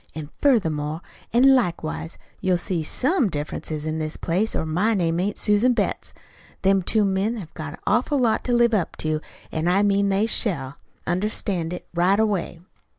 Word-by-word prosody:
An' 155 -1 -7
furthermore 160 - +1 0.3
an' 265 +4 +6
likewise 170 -8 -1 0.2
you'll 185 -1 +1
see 175 -1 -2
SOME 260 - +1
difference 150 -2 -5
in 155 0 -3
this 155 0 -3
place, 190 +6 0
or - - -1
my 180 +8 +1
name 170 -3 0
ain't 200 +3 -1
Susan 210 +5 +3
Betts. - - -2 0.5
Them 195 0 +4
two 210 +3 +2
men 195 +4 0
have 170 -7 -9
got 155 -2 -6
an - - -12
awful 245 +8 +1
lot 235 -4 +1
to 250 - -1
live 240 -1 +4
up 195 -6 0
to, 155 -1 -1 0.3
an' 160 +2 -1
I 190 +3 +3
mean 200 0 +2
they 195 +2 +2
shall 145 - -1 0.3
understand 180 -2 -1
it 180 - -6
right 180 +4 +3
away." 200 -6 -1
190 Hz, 175 wpm, -23 LUFS, 160-220 Hz, 0.5 s, an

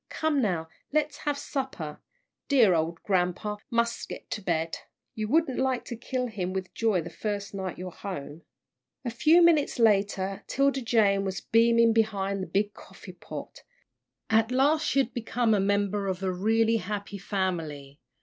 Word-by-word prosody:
Come 310 -3 0
now, 175 -8 0 0.2
let's 300 0 +1
have 290 -1 -2
supper. 260 - -4 0.5
Dear 240 -9 +5
ole 165 0 +1
grampa 190 +2 0
mus' 235 0 0
get - - -9
to 215 - -3
bed. 165 -3 -1 0.3
You 215 -1 -3
wouldn't 295 +1 +2
like 260 -2 0
to 240 - -5
kill 255 +2 -3
him 185 -6 -3
with 190 -1 -4
joy 220 -6 +1
the 170 - -8
first 205 -2 -4
night 190 -2 -4
you're 185 0 -6
home." 165 -5 -7 0.6
A 240 - -1
few 315 +9 +5
minutes 325 -4 +4
later 195 -3 +2
'Tilda 275 0 +1
Jane 210 -5 +3
was 190 -1 -3
beaming 230 0 +4
behind 200 -3 0
the 185 - -4
big 205 +1 0
coffee - - -12
pot. - - -9 0.7
At 225 0 +3
last 290 +5 +3
she - - 0
had 255 -3 +2
become 240 -1 0
a 205 - +3
member 200 0 +1
of 190 0 -3
a 190 - +1
really 225 +4 +2
happy 200 0 -5
family. 160 -8 -3
210 Hz, 165 wpm, -27 LUFS, 190-240 Hz, 0.7 s, Dear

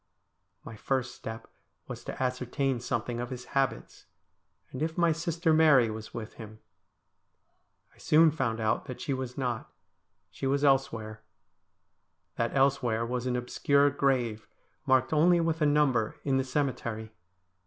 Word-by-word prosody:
My 115 - -9
first 125 +2 -2
step 110 -1 -8 0.4
was - - -7
to - - -4
ascertain 125 +1 -1
something 120 0 -3
of 120 0 -4
his 125 -1 -7
habits, 135 - -2 0.6
and 130 - -6
if 160 +1 -2
my 170 -1 +4
sister 165 0 0
Mary 145 -8 +5
was 110 0 -8
with 110 -2 -7
him. 110 0 -10 1.4
I - - -25
soon 160 +1 +5
found 130 -7 -2
out 110 -1 0
that 130 - -7
she 140 - -2
was 130 -1 -5
not. 125 -4 -3 0.6
She 135 - -4
was 140 +1 +1
elsewhere. 115 -6 +1 1.1
That - - -1
elsewhere 135 -4 +2
was 125 +1 -3
an 125 - 0
obscure 140 +3 +2
grave, 125 -6 0 0.4
marked 130 +1 +3
only 170 +3 +4
with 165 -1 -1
a 150 - +4
number, 140 -7 +2
in 135 -2 +1
the 135 - +1
cemetery. 125 -5 -3
130 Hz, 145 wpm, -29 LUFS, 115-145 Hz, 1.4 s, Mary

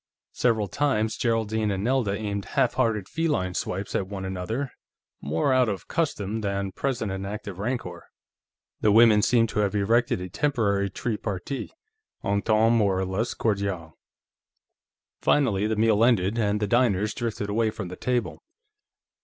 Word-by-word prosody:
Several 110 -4 +1
times, 110 -2 0
Geraldine 110 -2 0
and 95 -1 -2
Nelda 120 -4 +1
aimed 100 -2 -3
halfhearted 115 -5 +1
feline 150 - -1
swipes 95 +2 -3
at 95 - -1
one 95 -1 -5
another, 100 +9 -3 0.5
more 80 - +1
out 130 -3 +3
of 100 -2 -5
custom 110 - -1
than 100 -1 -2
present 115 -2 -2
and 95 0 -4
active 100 -1 -6
rancor. 100 -6 -4 0.7
The 105 - +3
women 110 -1 +6
seemed 115 0 +3
to 105 - -2
have 105 -1 +1
erected 115 +2 +2
a 90 - -5
temporary 100 - 0
tri 110 +2 -3
partite 105 +7 -5 0.5
Entente 110 +3 +2
more 105 -5 +3
or 95 - 0
less 95 +6 -2
Cordiale. 100 -7 -2 1.3
Finally, 110 -8 +2
the 110 - 0
meal 110 0 +3
ended, 110 -4 +3
and 105 -1 +1
the 105 - 0
diners 105 -2 +2
drifted 110 -3 -3
away 110 +1 +2
from 95 -4 -6
the 90 - -7
table. 125 +2 -2
105 Hz, 150 wpm, -26 LUFS, 100-115 Hz, 1.3 s, women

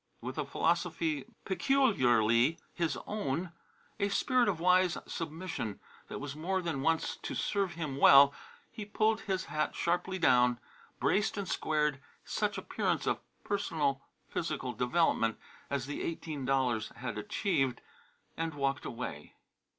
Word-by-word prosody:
With - - -5
a - - -1
philosophy 165 -3 0 0.2
peculiarly 130 - +3 0.2
his 170 -2 -1
own, 180 -4 -2 0.5
a 200 0 +1
spirit 250 +3 +2
of 175 -5 -1
wise 180 0 +4
submission 160 - -4 0.3
that - - -6
was 140 0 -5
more 185 +5 -1
than 165 -6 -2
once 160 +3 +1
to - - -5
serve 195 -3 0
him 150 -5 -4
well, 140 0 +8 0.4
he 225 -2 -6
pulled 215 +2 +1
his 190 -4 -2
hat 155 0 -1
sharply 180 +2 0
down, 125 -7 +4 0.4
braced 205 +1 +1
and 200 -2 -3
squared 150 -4 0 0.2
such - - -1
appearance - - -1
of - - +1 0.3
perfect 160 -9 0 0.3
physical 145 -6 -3
development 120 -2 +2 0.3
as 140 -3 -1
the 145 - -4
eighteen 155 -4 -4
dollars 125 -5 +1
had 120 -2 -5
achieved, 135 - 0 0.6
and 165 -2 -3
walked 140 0 -1
away. 115 -12 -6
160 Hz, 135 wpm, -32 LUFS, 135-185 Hz, 0.6 s, well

